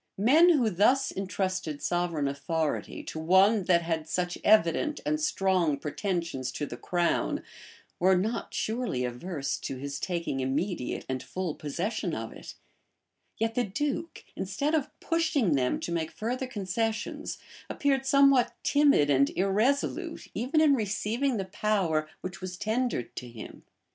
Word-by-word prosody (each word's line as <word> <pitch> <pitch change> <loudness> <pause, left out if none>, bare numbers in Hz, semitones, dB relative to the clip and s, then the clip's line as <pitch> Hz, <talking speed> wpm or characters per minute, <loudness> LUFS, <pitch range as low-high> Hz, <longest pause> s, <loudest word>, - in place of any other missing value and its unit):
Men 290 - +6
who 255 -10 +3
thus 250 +9 +3
intrusted 185 -4 -2
sovereign 175 -5 0
authority 150 +3 -2
to 160 - -6
one 190 +5 +4
that 170 -1 +3
had 160 -2 -2
such 175 0 -1
evident 215 - +3
and 305 +1 0
strong 185 - +2
pretensions 155 -4 -3
to 145 - -3
the 120 - -7
crown, 170 - 0 0.6
were 185 +1 +4
not 215 +6 -2
surely 220 - -1
averse 140 +3 -3
to 135 - -5
his 140 +1 -5
taking 170 -7 -2
immediate 135 +3 -2
and 130 -1 -2
full 185 -4 -4
possession 175 +6 -3
of 110 0 -5
it; - - -10 0.8
yet 225 0 0
the 245 - +1
duke, 295 - -3
instead 205 +11 -2
of 305 -4 +1
pushing 315 - +1
them 130 -3 +1
to - - -4
make 165 -2 -1
further 250 +4 -3
concessions, 220 0 -3 0.3
appeared 275 -2 +1
somewhat 275 -2 +4
timid 285 - +4
and 140 0 +4
irresolute 210 +9 0
even 280 +6 +1
in 300 -2 +6
receiving 225 +3 0
the 195 - -2
power 185 -6 0
which 185 0 -6
was 180 -1 -5
tendered 220 - -1
to 125 - -6
him. 115 -2 -10
190 Hz, 145 wpm, -28 LUFS, 160-240 Hz, 0.8 s, Men